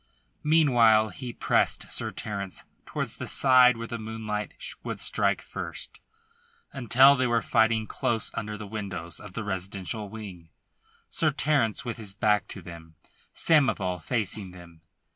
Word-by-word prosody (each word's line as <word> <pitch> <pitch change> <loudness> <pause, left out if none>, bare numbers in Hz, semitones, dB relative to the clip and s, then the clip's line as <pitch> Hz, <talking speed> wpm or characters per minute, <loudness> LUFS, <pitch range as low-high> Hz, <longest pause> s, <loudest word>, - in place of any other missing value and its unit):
Meanwhile 120 -9 +5
he 125 +2 -7
pressed - - 0
Sir - - 0
Terence 100 -3 -5 0.2
towards - - -4
the - - -5
side 125 -2 +6
where 115 - -5
the 115 0 -5
moonlight 110 -1 -4 0.3
would - - -5
strike - - 0
first, - - -6 0.7
until 135 +1 +6
they 130 -1 +1
were 115 -1 +1
fighting 110 -1 +2
close 115 0 -1
under 105 -1 -4
the 105 - -7
windows 100 -5 -6
of 105 -3 -11
the 115 - -4
residential 100 +2 -4
wing, 95 -6 -9 0.6
Sir - - +2
Terence 135 -8 +1
with 120 -2 -4
his 105 -4 -6
back 105 -2 +2
to 95 - -9
them, 80 -1 -11 0.4
Samoval 100 - +2
facing 105 0 -2
them. 85 -2 -14
110 Hz, 140 wpm, -27 LUFS, 95-120 Hz, 0.7 s, side